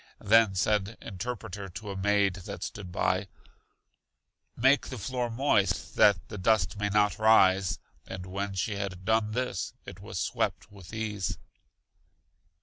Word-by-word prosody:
Then 110 -1 +5
said 105 +2 0
Interpreter 100 -1 -6
to 100 +3 -7
a - - -5
maid 100 0 +2
that - - -6
stood 95 -4 -6
by; 95 +2 0 1.3
Make 130 +4 +3
the 130 - -6
floor 125 +3 -2
moist 115 -4 +1
that 85 -9 +4
the 105 - -7
dust 105 -1 +2
may 105 0 0
not 105 0 +2
rise; 95 -4 +5 0.3
and 95 -1 -6
when 100 +1 -4
she 100 +2 -1
had 95 -2 -5
done 110 0 +2
this, 125 -5 -2
it - - -9
was - - -7
swept - - -2
with 95 -3 -13
ease. 110 -4 -3
100 Hz, 145 wpm, -29 LUFS, 95-110 Hz, 1.3 s, Then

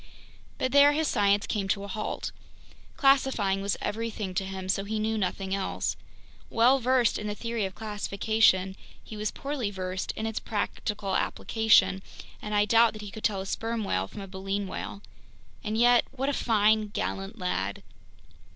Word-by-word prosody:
But 255 - -1
there 285 +1 +7
his 315 +1 +1
science 205 -2 +2
came 200 -2 -2
to 200 +1 0
a - - -6
halt. 205 +2 -4 0.7
Classifying 265 -8 +3
was 200 0 -1
everything 210 -2 -3
to 190 +1 -1
him, 190 -1 -6
so 195 +1 0
he 215 +2 -3
knew 220 +1 0
nothing 190 -1 -2
else. 195 -1 -1 0.5
Well 245 +4 +4
versed 255 -1 +2
in 210 - -4
the 210 - -3
theory 230 -2 -2
of 190 -1 -6
classification, 205 -2 +1 0.3
he 220 - -9
was 210 0 -2
poorly 275 -6 -3
versed 185 -1 -3
in 220 - -4
its 225 -1 -2
practical 205 -2 -3
application, 220 -4 +3 0.4
and 210 0 -3
I 205 0 +4
doubt 230 +2 +5
that 215 -1 -8
he 205 - -7
could 220 - -9
tell 195 -3 +1
a - - -6
sperm 225 +3 -2
whale 95 - -1
from 200 - -9
a 195 - -7
baleen 195 +1 -3
whale! 200 +1 -6 0.6
And 215 +1 -2
yet, 240 +1 +5
what 270 +1 -2
a - - 0
fine, 215 -3 +3
gallant 195 -1 -4
lad! 100 - -2
210 Hz, 175 wpm, -28 LUFS, 195-225 Hz, 0.7 s, there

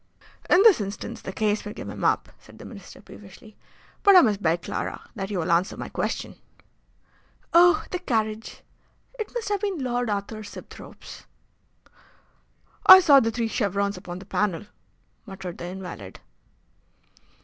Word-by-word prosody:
"In 365 +3 +6
this 430 - +6
instance 200 +1 -6
the - - -6
case 210 +1 -1
may 210 - -7
give - - -8
him - - -7
up," - - +1
said - - -17
the - - -12
Minister, 200 -5 -12
peevishly; 205 +2 -15 0.5
"but 400 -1 +6
I 365 - +10
must 210 -6 +1
beg, 165 -1 0
Clara, - - -5
that 195 -3 -5
you 205 - -3
will 170 0 -1
answer 175 +3 +1
my - - -6
question." - - -4 1.2
"Oh! 355 +5 +6
the 360 - -2
carriage! 220 -8 -3 0.6
It 435 - -4
must 460 -3 -3
have 410 -2 -1
been 400 -4 -2
Lord 245 -2 -1
Arthur 205 +1 -4
Sibthorpe's." 205 - -12 1.6
"I 375 - +12
saw 290 -7 +6
the 225 - 0
three 230 0 -2
chevrons 200 -2 -1
upon 180 -1 -8
the 190 - -11
panel," 200 -3 -1 0.6
muttered 190 -3 -8
the - - -6
invalid. 180 - -9
210 Hz, 155 wpm, -25 LUFS, 190-270 Hz, 1.6 s, I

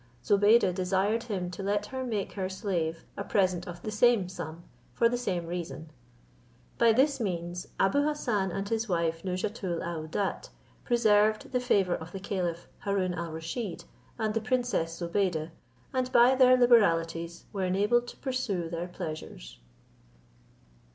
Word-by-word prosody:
Zobeide 205 -1 +5
desired 190 +4 +1
him 185 -6 -3
to 185 - -7
let 205 +1 0
her 260 +2 -5
make 215 -6 -2
her 190 -2 -3
slave 180 -5 -2
a 200 - -4
present 185 -4 +1
of 175 -1 -8
the 215 - -3
same 215 -3 +4
sum, 170 -2 -7 0.3
for 230 - +4
the 240 - 0
same 185 -8 -2
reason. 165 -2 -6 0.9
By 235 -1 +6
this 270 +5 +3
means 175 -4 -3
Abou 195 +9 +3
Hassan 240 -10 0
and 195 +3 -3
his 225 +1 -1
wife 165 -2 0
Nouzhatoul 185 -1 -2
aouadat 170 +3 -3 0.3
preserved 215 -3 +3
the 250 - +1
favour 200 -7 +2
of 160 +1 -6
the 195 - -5
caliph 180 -4 -3
Haroon 195 -3 0
al 170 -1 -4
Rusheed 165 +6 -5 0.3
and 220 -2 -1
the 225 - 0
princess 225 -9 -1
Zobeide, 170 -2 -1 0.4
and 255 -1 0
by 245 +1 +6
their 255 -1 +6
liberalities 170 -8 +3
were 195 -2 -1
enabled 210 +6 +2
to - - -9
pursue 220 -11 -2
their 170 +1 -3
pleasures. - - -7
195 Hz, 150 wpm, -29 LUFS, 170-230 Hz, 0.9 s, By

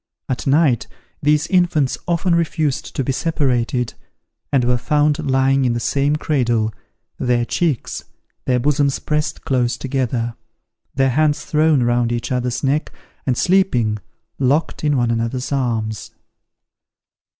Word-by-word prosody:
At 130 0 -3
night 135 -6 +3 0.3
these 150 +1 +3
infants 170 -7 +2
often 175 +1 +1
refused 160 -4 -1
to 135 - 0
be 135 - -1
separated, 125 -6 0 0.6
and 135 -3 +3
were 125 0 +2
found 150 +3 +2
lying 135 +1 +3
in 125 -2 +2
the 120 - -1
same 140 +4 +1
cradle, 120 -8 0 0.5
their 120 -1 +1
cheeks, 150 -2 -1 0.4
their 125 -1 +2
bosoms 140 +1 +1
pressed 150 0 -2
close 125 -3 +1
together, 125 -3 -2 0.6
their 135 -1 +3
hands 150 +2 +1
thrown 155 -3 +3
round 120 0 +1
each 120 0 -3
other's 125 +1 -1
neck, 140 +3 0 0.4
and 125 -2 +1
sleeping, 125 - +2 0.4
locked 140 +6 +1
in 145 -2 +2
one 120 -2 +1
another's 115 +3 -2
arms. 115 -5 -2
135 Hz, 130 wpm, -19 LUFS, 120-150 Hz, 0.6 s, night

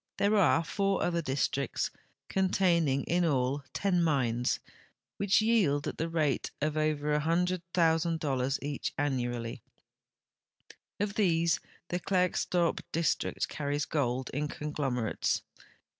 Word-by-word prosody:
There 205 +2 +3
are 175 -4 +4
four 195 +3 0
other 170 -1 0
districts, 140 -2 -1 0.4
contain 185 -3 +2
ing 135 0 +1
in 175 +1 +1
all 140 -2 +1
ten 185 -3 +1
mines, 125 -6 +1 0.6
which 200 +1 +3
yield 190 -11 +2
at - - -5
the 165 +1 -1
rate 155 -4 0
of 150 +1 -1
over 155 -1 0
8100,000 165 -5 +1
each 145 -1 -3
annually. 120 -3 -2 1.4
Of 205 0 -1
these 170 -5 +2 0.3
the 175 - -1
Klerksdorp 180 -1 +1
district 165 -2 0
carries 145 0 -2
gold 130 -3 -1
in 150 +2 -1
conglomerates. 140 -6 -1
155 Hz, 115 wpm, -30 LUFS, 140-175 Hz, 1.4 s, are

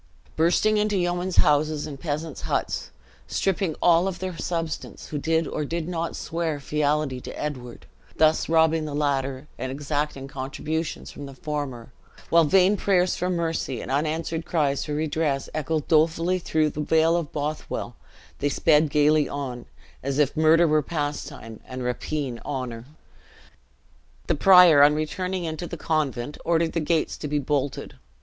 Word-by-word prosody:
Bursting 180 +6 +3
into 210 -1 +1
yeomen's 175 +1 -1
houses 150 0 +3
and 140 -3 -7
peasants' 155 -1 -4
huts, - - -2 0.4
stripping 190 -4 0
all 175 +1 +5
of 190 -2 -3
their 185 -1 -4
substance 165 -1 -4
who 150 - -3
did 160 +1 +1
or - - -3
did 165 +2 -3
not 170 -2 -3
swear 165 -2 -3
fealty 145 -2 0
to - - -8
Edward; 125 -5 -6 0.3
thus 155 0 +3
robbing 160 -1 +3
the 145 -1 -4
latter, 140 -1 -1
and 130 +1 -3
exacting 145 0 -3
contributions 150 +4 -4
from 145 - -8
the 135 - -11
former; 130 -4 -5 0.4
while 170 -1 +6
vain 190 +5 +4
prayers 185 -3 +2
for 180 - -2
mercy 165 -7 -2
and - - -6
unanswered 160 +3 -1
cries 150 -5 0
for 150 - -3
redress 150 -2 -1
echoed 155 0 -2
dolefully 165 +3 +2
through 155 -3 +1
the 150 - -4
vale 160 +2 +3
of 170 -4 -2
Bothwell, 150 +1 -4 0.4
they 145 - +1
sped 155 +1 +3
gayly 150 +1 +3
on, 130 -4 -5 0.3
as 135 +1 -2
if 145 -2 +2
murder 160 +2 +5
were 155 0 +3
pastime 145 -7 -5
and 130 0 -7
rapine 125 0 -3
honor. 125 -4 -5 1.4
The - - +1
prior, 180 -2 +7
on 145 +1 +6
returning 180 +4 -2
into 165 +1 -4
the 170 - -6
convent, 150 -4 -2
ordered 165 -1 +1
the 165 - 0
gates 160 0 0
to 150 - -5
be 150 0 0
bolted. 140 -1 -2
155 Hz, 155 wpm, -25 LUFS, 145-165 Hz, 1.4 s, prior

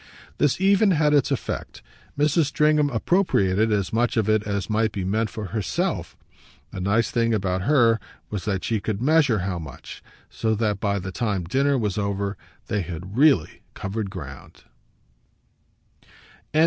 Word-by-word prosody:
This 150 +1 +2
even 200 +2 +4
had 150 -1 +3
its 145 -3 +3
effect: 135 - -4 0.3
Mrs. 150 +2 +3
Stringham 150 +1 +2
appropriated 115 - +2
as 100 -2 0
much 120 +1 +1
of 110 -2 +2
it 110 -1 +3
as 100 -1 -2
might 110 0 +1
be 100 -3 -4
meant 110 +3 0
for 105 -4 -6
herself. 105 -5 -2 0.5
The 95 - -6
nice 105 +5 +1
thing 115 -1 +1
about 95 -2 -1
her 115 -2 +3 0.3
was 105 -3 -4
that 95 -3 -1
she 110 -2 0
could 100 +1 -3
measure 145 -2 +3
how 90 -3 -2
much; 80 -3 -10 0.3
so 110 -1 -1
that 105 -2 0
by 100 -1 0
the 95 -1 -5
time 100 -2 -1
dinner 135 +10 +1
was 105 -4 -1
over 100 0 -2 0.3
they 105 -2 -1
had 90 +3 -7
really 135 - +3
covered 100 +1 -4
ground. 75 -8 -10
110 Hz, 155 wpm, -24 LUFS, 100-135 Hz, 0.5 s, even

